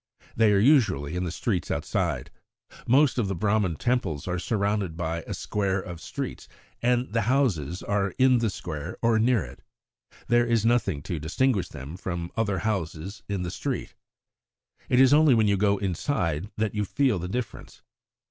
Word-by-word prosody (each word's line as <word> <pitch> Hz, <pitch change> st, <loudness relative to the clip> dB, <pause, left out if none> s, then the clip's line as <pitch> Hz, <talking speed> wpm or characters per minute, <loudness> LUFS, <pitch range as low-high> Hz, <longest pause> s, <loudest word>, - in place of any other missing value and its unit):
They 110 Hz, -2 st, +4 dB
are 100 Hz, -, +4 dB
usually 100 Hz, -, +3 dB
in 90 Hz, 0 st, -1 dB
the 85 Hz, -, -3 dB
streets 95 Hz, 0 st, -2 dB
outside. -, -, -2 dB, 0.6 s
Most 135 Hz, +1 st, +4 dB
of 110 Hz, -, +1 dB
the 95 Hz, -, -2 dB
Brahman 100 Hz, -1 st, +1 dB
Temples 100 Hz, -, -1 dB
are 90 Hz, 0 st, -1 dB
surrounded 100 Hz, -3 st, -1 dB
by 85 Hz, -1 st, -2 dB
a -, -, -3 dB
square 100 Hz, -2 st, -1 dB
of 90 Hz, -3 st, -8 dB
streets, -, -, -6 dB, 0.3 s
and 125 Hz, -1 st, +1 dB
the 115 Hz, -, +2 dB
houses 95 Hz, -, 0 dB
are 100 Hz, -2 st, -1 dB
in 130 Hz, -1 st, +5 dB
the 115 Hz, -1 st, +1 dB
square 80 Hz, -2 st, -6 dB
or 115 Hz, -1 st, +3 dB
near 115 Hz, -, +2 dB
it. -, -, -13 dB, 0.7 s
There 120 Hz, 0 st, +3 dB
is 115 Hz, -2 st, +2 dB
nothing 115 Hz, -11 st, +1 dB
to 85 Hz, -3 st, -4 dB
distinguish 100 Hz, -, 0 dB
them 70 Hz, +6 st, -8 dB
from 85 Hz, -2 st, -4 dB
other 105 Hz, -4 st, 0 dB
houses 95 Hz, -2 st, -3 dB
in 100 Hz, -3 st, -2 dB
the 85 Hz, -, -4 dB
street. -, -, -4 dB, 1.0 s
It 125 Hz, -, +4 dB
is 135 Hz, +1 st, +6 dB
only 150 Hz, -3 st, +6 dB
when 110 Hz, -2 st, +3 dB
you 100 Hz, -, +3 dB
go 100 Hz, +1 st, +2 dB
inside 95 Hz, -, -1 dB
that 110 Hz, -1 st, 0 dB
you 105 Hz, -1 st, 0 dB
feel 125 Hz, 0 st, +1 dB
the 90 Hz, -, -4 dB
difference. 105 Hz, +1 st, -6 dB
100 Hz, 175 wpm, -26 LUFS, 90-120 Hz, 1.0 s, is